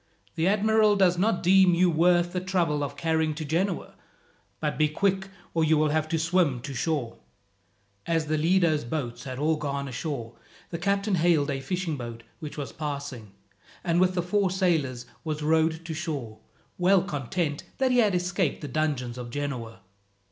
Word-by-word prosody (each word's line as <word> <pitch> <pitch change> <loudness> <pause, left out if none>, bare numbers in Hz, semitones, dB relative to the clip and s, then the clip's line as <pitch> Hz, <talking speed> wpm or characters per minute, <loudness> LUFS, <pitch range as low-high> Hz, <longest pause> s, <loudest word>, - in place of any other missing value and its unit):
"The 165 +1 0
admiral 215 +1 +4
does 180 -3 +3
not 200 -1 +1
deem 185 -1 +6
you 180 +1 +4
worth 175 +2 +3
the 180 - 0
trouble 175 -5 0
of 140 0 -5
carrying 160 0 0
to 155 0 -5
Genoa; 175 +5 -1 0.7
but 150 -1 -1
be 155 -1 +2
quick, 190 +4 0 0.3
or 165 - +2
you 160 0 +4
will 155 0 +3
have 155 +1 0
to 165 - +1
swim 165 -5 +2
to 135 - -6
shore." 135 -3 -2 0.9
As 165 -2 +1
the 155 +1 0
Lido's 165 -1 +2
boats 120 0 -4
had 130 -1 -5
all 155 +3 +1
gone 140 -2 -3
ashore, 125 -3 -4 0.4
the 170 - -4
captain 200 +3 0
hailed 160 -4 +3
a 135 -1 -3
fishing 175 0 -2
boat 115 -2 -7 0.2
which 155 -3 -7
was 145 -2 -4
passing, 140 -9 -5 0.5
and 170 +1 +2
with 185 0 +3
the 175 - 0
four 195 +2 +1
sailors 160 -10 0 0.2
was 155 -2 -3
rowed 160 +1 +2
to 165 - -4
shore, 145 -10 -4 0.4
well 185 +1 +4
content 150 -1 -2
that 260 -1 +2
he 250 - +4
had 210 -5 +3
escaped 180 -2 0
the 145 - -5
dungeons 130 -4 -2
of 120 -1 -6
Genoa. 120 -6 -4
160 Hz, 175 wpm, -27 LUFS, 145-180 Hz, 0.9 s, deem